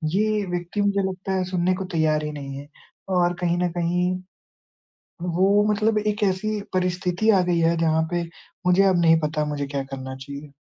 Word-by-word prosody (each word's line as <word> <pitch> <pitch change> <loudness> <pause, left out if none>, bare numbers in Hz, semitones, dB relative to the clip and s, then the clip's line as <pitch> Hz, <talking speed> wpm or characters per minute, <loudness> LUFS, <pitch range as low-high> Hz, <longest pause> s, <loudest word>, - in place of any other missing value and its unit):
ये 210 -1 +1
व्यक्ति, 175 +3 -2
मुझे 200 -1 +2
लगता 190 +1 -5
है, 185 -1 +1
सुनने 180 0 +1
को 190 0 -4
तैयार 155 -1 +2
ही 150 - -3
नहीं 140 -2 -6
है 140 +1 -9 0.5
और 175 0 +3
कहीं 175 0 +1
न 175 - +1
कहीं, 180 +2 +1 1.1
वो 190 +4 +3
मतलब 215 +1 +2
एक 210 0 -1
ऐसी 205 +2 0
परिस्थिति 180 +3 +1
आ 190 -3 +4
गयी 175 -1 +1
है, 165 +1 +3
जहाँ 160 -1 +2
पे 175 0 0 0.4
मुझे 180 +2 +5
अब 185 -3 +3
नहीं 165 -1 +5
पता, 150 0 -1
मुझे 145 -1 -3
क्या 140 -1 -3
करना 130 0 -6
चाहिए। 140 +2 -9
175 Hz, 185 wpm, -24 LUFS, 155-190 Hz, 1.1 s, मुझे